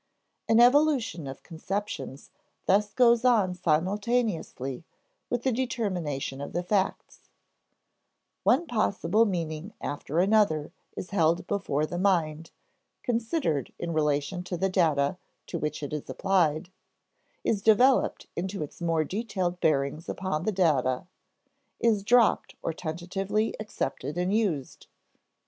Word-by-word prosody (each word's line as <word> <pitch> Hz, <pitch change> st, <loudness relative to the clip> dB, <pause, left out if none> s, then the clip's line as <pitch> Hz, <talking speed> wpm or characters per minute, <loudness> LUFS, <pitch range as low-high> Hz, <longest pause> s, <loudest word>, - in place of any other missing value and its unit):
An 225 Hz, -, +5 dB
evolution 245 Hz, -, +4 dB
of 135 Hz, 0 st, -8 dB
conceptions 165 Hz, -6 st, -5 dB, 0.3 s
thus 205 Hz, +2 st, +3 dB
goes 235 Hz, -2 st, +4 dB
on 220 Hz, -7 st, +3 dB
simultaneously 180 Hz, -, -1 dB, 0.5 s
with 245 Hz, -1 st, -1 dB
the 265 Hz, -, +2 dB
determination 180 Hz, -, -2 dB
of 140 Hz, -, -6 dB
the 175 Hz, -, -1 dB
facts; 190 Hz, +1 st, -2 dB, 1.1 s
one 345 Hz, -, +3 dB
possible 215 Hz, -, +2 dB
meaning 170 Hz, 0 st, -3 dB
after 145 Hz, +1 st, -4 dB
another 185 Hz, -6 st, +3 dB, 0.3 s
is 185 Hz, -, -6 dB
held 170 Hz, -3 st, +2 dB
before 165 Hz, -8 st, -1 dB
the 175 Hz, +3 st, -4 dB
mind, 165 Hz, -4 st, +1 dB, 0.5 s
considered 230 Hz, -, -1 dB
in 170 Hz, -1 st, -3 dB
relation 150 Hz, +3 st, 0 dB
to 175 Hz, 0 st, -3 dB
the 190 Hz, +3 st, +1 dB
data 160 Hz, -3 st, +1 dB, 0.3 s
to 170 Hz, -, -4 dB
which 150 Hz, -1 st, -3 dB
it 145 Hz, -, -5 dB
is 150 Hz, -, -5 dB
applied, 175 Hz, -3 st, +1 dB, 0.7 s
is 205 Hz, -, 0 dB
developed 245 Hz, +5 st, +4 dB
into 185 Hz, -1 st, -3 dB
its 150 Hz, -, -10 dB
more 165 Hz, -2 st, +1 dB
detailed 185 Hz, -1 st, -2 dB
bearings 150 Hz, +1 st, 0 dB
upon 180 Hz, -3 st, -2 dB
the 215 Hz, -, +2 dB
data, 145 Hz, -9 st, +1 dB, 0.7 s
is 225 Hz, -3 st, +2 dB
dropped 240 Hz, +1 st, +3 dB
or 165 Hz, -, -1 dB
tentatively 185 Hz, +7 st, -2 dB
accepted 160 Hz, -8 st, -4 dB
and 180 Hz, +2 st, 0 dB
used. 185 Hz, -, -1 dB
180 Hz, 120 wpm, -27 LUFS, 155-215 Hz, 1.1 s, An